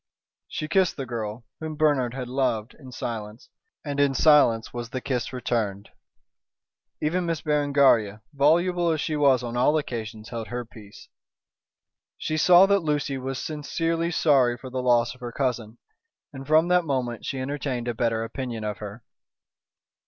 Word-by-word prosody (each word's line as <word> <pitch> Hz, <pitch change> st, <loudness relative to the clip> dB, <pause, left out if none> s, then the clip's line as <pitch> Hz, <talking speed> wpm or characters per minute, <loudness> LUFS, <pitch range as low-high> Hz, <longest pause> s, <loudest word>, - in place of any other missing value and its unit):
She 155 Hz, -, -4 dB
kissed 190 Hz, +1 st, +2 dB
the 135 Hz, -, -4 dB
girl, 115 Hz, -1 st, -5 dB
whom 160 Hz, -1 st, -5 dB
Bernard 145 Hz, -5 st, +1 dB
had 130 Hz, -2 st, -4 dB
loved, 125 Hz, -4 st, -1 dB
in 130 Hz, -3 st, -12 dB
silence; 110 Hz, -2 st, -6 dB, 0.4 s
and 145 Hz, -1 st, -3 dB
in 140 Hz, -1 st, +3 dB
silence 135 Hz, -7 st, +4 dB
was 120 Hz, -1 st, -5 dB
the 130 Hz, -, -4 dB
kiss 125 Hz, -2 st, -2 dB
returned. 110 Hz, -6 st, -2 dB, 1.1 s
Even 175 Hz, +3 st, 0 dB
Miss 165 Hz, -3 st, -2 dB
Berengaria, 140 Hz, -8 st, +2 dB
voluble 170 Hz, +5 st, +3 dB
as 160 Hz, -1 st, 0 dB
she 155 Hz, +1 st, -2 dB
was 135 Hz, -4 st, +3 dB
on 120 Hz, 0 st, -5 dB
all 140 Hz, +5 st, +3 dB
occasions, 110 Hz, -6 st, -5 dB
held 115 Hz, -2 st, -5 dB
her 120 Hz, 0 st, -4 dB
peace. 105 Hz, -3 st, -14 dB, 1.1 s
She 155 Hz, -, -3 dB
saw 175 Hz, +4 st, +7 dB
that 200 Hz, 0 st, +3 dB
Lucy 150 Hz, -4 st, -1 dB
was 135 Hz, 0 st, -4 dB
sincerely 165 Hz, +3 st, -2 dB
sorry 135 Hz, -7 st, +3 dB
for 130 Hz, +1 st, -10 dB
the 130 Hz, 0 st, -2 dB
loss 120 Hz, -2 st, +2 dB
of 125 Hz, -, -20 dB
her 120 Hz, -1 st, -5 dB
cousin, 120 Hz, -4 st, -2 dB, 0.6 s
and 135 Hz, 0 st, -9 dB
from 155 Hz, +2 st, +4 dB
that 180 Hz, 0 st, +4 dB
moment 125 Hz, -6 st, -2 dB
she 135 Hz, -, -4 dB
entertained 130 Hz, -2 st, -3 dB
a 120 Hz, -, 0 dB
better 115 Hz, -1 st, 0 dB
opinion 115 Hz, -1 st, -5 dB
of 105 Hz, -1 st, -4 dB
her. 105 Hz, +2 st, -8 dB
130 Hz, 160 wpm, -25 LUFS, 120-150 Hz, 1.1 s, saw